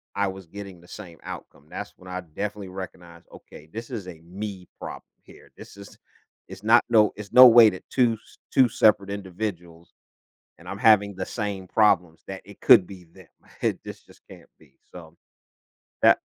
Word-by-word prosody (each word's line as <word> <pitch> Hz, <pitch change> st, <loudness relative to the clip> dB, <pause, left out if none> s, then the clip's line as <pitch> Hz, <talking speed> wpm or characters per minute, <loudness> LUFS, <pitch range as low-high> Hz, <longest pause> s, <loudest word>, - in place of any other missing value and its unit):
I 100 Hz, 0 st, 0 dB
was 95 Hz, -2 st, -8 dB
getting 100 Hz, 0 st, -10 dB
the 85 Hz, -, -19 dB
same 85 Hz, -6 st, -11 dB
outcome, 70 Hz, +2 st, -10 dB
that's -, -, -7 dB
when 90 Hz, -, -16 dB
I 90 Hz, 0 st, -5 dB
definitely 100 Hz, +4 st, -6 dB
recognized, 90 Hz, -2 st, -10 dB
"Okay, 75 Hz, -, -14 dB
this 115 Hz, +2 st, -7 dB
is 105 Hz, -7 st, -6 dB
a 80 Hz, -3 st, -11 dB
me 95 Hz, +1 st, -8 dB
problem -, -, -8 dB, 0.2 s
here, -, -, -18 dB
this -, -, -13 dB
is 100 Hz, 0 st, -13 dB, 0.5 s
it's -, -, -12 dB
not 115 Hz, +2 st, +5 dB
no 110 Hz, -3 st, +4 dB
it's 105 Hz, -1 st, -10 dB
no 130 Hz, 0 st, +10 dB
way 115 Hz, -2 st, +8 dB
that 95 Hz, -, -10 dB
2 120 Hz, -3 st, +3 dB
s 110 Hz, -, -14 dB, 0.2 s
2 130 Hz, -2 st, +5 dB
separate 105 Hz, -2 st, +3 dB
individuals 90 Hz, -4 st, -7 dB, 0.6 s
and -, -, -13 dB
I'm 100 Hz, -, -5 dB
having 100 Hz, -3 st, +4 dB
the 95 Hz, -, -3 dB
same 100 Hz, -4 st, -5 dB
problems, 90 Hz, -7 st, +1 dB
that 95 Hz, -1 st, -7 dB
it 100 Hz, -, -15 dB
could 90 Hz, -, +6 dB
be 95 Hz, -3 st, -12 dB
them." 80 Hz, -, -18 dB, 0.3 s
It -, -, -1 dB
just -, -, -10 dB
just -, -, -20 dB
can't -, -, -15 dB
be, 65 Hz, -, -24 dB, 0.2 s
so, 85 Hz, -2 st, -13 dB, 0.9 s
that -, -, +5 dB
95 Hz, 185 wpm, -24 LUFS, 90-105 Hz, 0.9 s, no